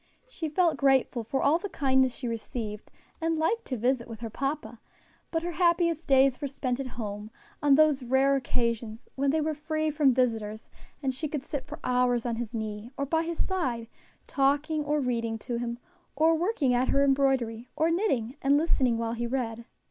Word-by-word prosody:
She 325 -10 -5
felt 335 +1 +2
grateful 265 -3 +2
for 270 +5 -1
all 305 +4 +4
the 405 - -5
kindness 265 -4 +2
she 250 - -5
received, 220 -2 -5 0.3
and 325 0 +1
liked 425 +9 0
to 255 - -3
visit 245 +1 0
with 225 -1 -9
her 225 -2 -5
papa; 270 -4 -3 0.5
but 325 0 -1
her 350 - -2
happiest 340 -2 +2
days 270 -2 +4
were 285 - -1
spent 260 -2 -3
at 270 - -3
home 210 -2 -5 0.3
on 290 -2 +5
those 305 -2 +4
rare 265 +3 +3
occasions 235 -2 -2
when 275 +1 0
they 310 +3 +2
were 310 +1 0
free 310 +1 -1
from 290 -3 +4
visitors, 225 -4 -1 0.4
and 265 -1 0
she 310 +5 -3
could 290 -2 -4
sit 285 -2 -5
for - - -7
hours 250 -1 +2
on 235 -2 -1
his 235 -2 -4
knee, 220 -1 -5
or 280 - -1
by 320 +3 +1
his 335 0 -2
side, 260 -12 -1 0.4
talking 290 +3 +1
or 295 +1 0
reading 230 -4 -1
to 240 +2 -4
him, 235 0 -3 0.4
or 320 +3 +4
working 325 - +1
at 245 +1 +2
her 275 0 +3
embroidery, 265 -4 +1
or 320 +2 +2
knitting 280 - 0
and 280 +1 +4
listening 265 -7 +2
while 230 0 -2
he 235 0 -2
read. 235 -2 -3
270 Hz, 195 wpm, -28 LUFS, 235-305 Hz, 0.5 s, on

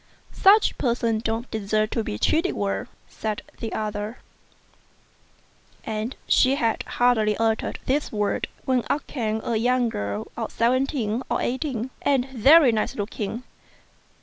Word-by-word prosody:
" - - -35
Such 410 +3 +4
people 235 -3 +1
don't 225 +2 -3
deserve 215 0 0
to 230 - -1
be 105 - -4
treated 330 - +1
well," 200 -1 -2 0.2
said 215 -1 -4 0.2
the 225 - -4
.other; 210 +2 -3 1.7
and 220 +3 -3
she 265 +1 +4
had 230 -5 0
hardly 220 -4 +2
uttered 225 -1 0
these 290 +3 0
words 210 -1 -1 0.2
when 255 -2 +1
up 300 - 0
came 220 -4 -2
a 230 - 0
young 245 +1 +2
girl 100 - -3
of 230 - -4
seventeen 245 -1 0
or - - 0
eighteen, 260 -1 -2
and 270 -2 +2
very 270 +3 +6
nice 220 -1 -1
looking. 215 +2 -4
230 Hz, 140 wpm, -24 LUFS, 215-255 Hz, 1.7 s, very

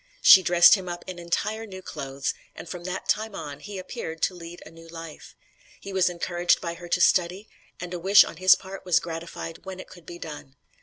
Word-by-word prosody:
She 190 - +9
dressed 175 -1 +6
him 190 -3 0
up 175 0 -6
in 185 -2 -7
entire 215 +6 -3
new 190 -2 -10
clothes, 135 -3 -4 0.2
and - - -10
from 175 0 -8
that 185 +1 -5
time 220 +1 -1
on 145 -3 -7
he 205 +5 -8
appeared 165 -3 -7
to - - +2
lead 175 0 -10
a 155 - -12
new 165 0 -15
life. 165 -2 -11 0.4
He 195 - -9
was 190 -1 +3
encouraged 175 0 0
by 170 - -4
her 175 +1 -11
to 180 - +1
study, 185 +3 +2 0.3
and 180 0 -7
a 175 - -4
wish 195 +4 +7
on - - -9
his 185 +1 +6
part 195 0 -10
was 180 -2 +3
gratified 165 0 -7
when 190 -1 -8
it - - -9
could 175 -3 -16
be 175 - -8
done. 150 -5 -9
175 Hz, 220 wpm, -25 LUFS, 165-185 Hz, 0.4 s, She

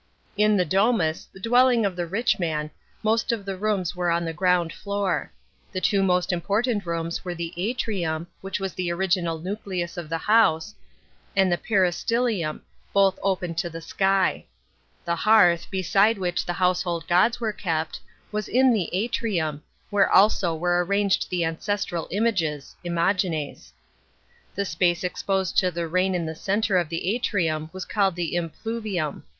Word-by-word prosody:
In 210 0 +3
the 180 - +2
domus, 190 -2 +1
the 190 - -14
dwelling 245 +1 +4
of 195 -3 -1
the 175 -1 -3
rich 230 +6 0
man, 155 -3 -2 0.3
most 225 +3 +1
of 220 -4 -3
the 195 -1 -3
rooms 185 -3 -1
were 180 -1 0
on 170 0 +1
the 165 - -3
ground 175 -1 +1
floor. 200 -3 -2 0.4
The 185 - -2
two 195 +1 +2
most 180 -1 +2
important 205 +3 0
rooms 170 0 -3
were 180 -1 -4
the 170 0 -5
atrium, 180 -5 -2 0.2
which 195 +1 -4
was 195 -2 -3
the 180 -2 -2
original 170 -2 0
nucleus 185 -1 -4
of 170 -3 -6
the 165 - -1
house, 210 -2 +3 0.6
and 190 -2 +3
the 175 - +2
peristylium, 195 -2 0 0.3
both 195 -1 +3
open 185 -3 -1
to 170 +1 -2
the 165 0 -7
sky. 190 +3 +1 0.6
The 170 0 0
hearth, 175 -4 +4
beside 195 +3 +2
which 180 -2 -2
the 175 - -1
household 175 -2 0
go 175 +1 +5
is 240 +1 -2
were 220 -3 -1
kept, 160 -5 -2 0.3
was 210 -1 -3
in 255 0 +4
the 200 -7 0
atrium, 185 -7 -1 0.3
where 205 -1 +3
also 190 -4 +4
were 175 +2 +1
arranged 200 +1 +1
the 175 -2 0
ancestral 175 +1 -2
images 170 -9 -1
(imagines')* 170 -3 -1 0.8
The 200 - -1
space 175 0 +1
exposed 190 +1 0
to 185 - +2
the 170 -1 -3
rain 185 +3 +1
in 170 -2 -1
the 160 - -4
centre 200 +4 0
of 170 -3 -2
the 165 0 -3 0.2
a'rium 160 -8 -1
was 185 0 -6
calle 200 -2 +2
1 180 - -12
the 175 -3 -3
impluvium. 175 0 -3
185 Hz, 165 wpm, -25 LUFS, 170-205 Hz, 0.8 s, go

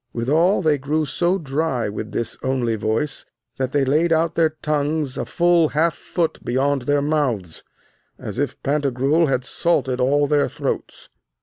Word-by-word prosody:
Withal 155 - +2
they 150 -3 +2
grew 150 +3 0
so 175 +5 0
dry 145 -5 -1
with 105 +2 -5
this 115 - -3
only 130 -3 0
voice, 110 +7 -2 0.4
that 130 -1 -1
they 140 -1 +2
laid 155 +5 +2
out 165 0 +2
their 160 -2 +1
tongues 150 -2 0
a - - -3
full 170 -2 +3
half 165 +1 +3
foot 170 -3 -3
beyond 135 +3 0
their 145 0 +2
mouths, 130 - -1 0.5
as - - -6
if - - -2
Pantagruel 140 +2 +1
had 130 -1 0
salted 135 -5 0
all 145 +3 +3
their 145 0 +2
throats. - - -5
145 Hz, 160 wpm, -21 LUFS, 130-160 Hz, 0.5 s, full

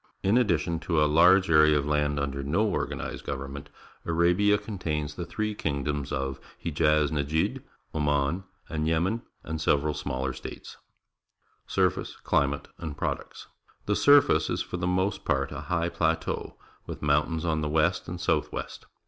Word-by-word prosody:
In 100 +4 +3
addition 85 -8 +2
to 85 -1 0
a 75 - +5
large 90 +5 +5
area 75 -1 +6
of 70 - -1
land 75 -1 +1
under 70 -1 -2
no 80 +11 +1
organized 100 - -3
government, 70 0 -6 0.3
Arabia 90 +5 +3
contains 75 -9 -3
the 85 +2 -6
three 105 +5 -2
kingdoms 70 -5 -2
of 65 0 -2 0.2
Hejaz 75 -1 +2
Nejd, 75 +2 0 0.3
Oman, 75 +3 0 0.2
and 80 0 -2
Yemen, 90 +8 +1 0.2
and 80 0 -4
several 75 0 +2
smaller 65 -1 -3
states. 65 - -9 0.9
AFGHANISTAN - - +2
213 - - -4
Surface, - - -10
Climate, 70 0 +1
and 80 -3 -6
Products. - - -4 0.2
— - - -33
The 105 - +1
sur 145 +4 +7
face 80 -9 +1
is - - -1
for 90 - -5
the 90 0 -1
most 95 +2 0
part 70 +1 0
a - - -5
liigh 85 -1 0
plateau, 80 -1 -1 0.3
with - - -7
mountains 75 +3 +1
on 80 -2 0
the 75 - -1
west 75 0 +1
and - - -5
south - - 0
west. - - -6
80 Hz, 165 wpm, -27 LUFS, 75-85 Hz, 0.9 s, sur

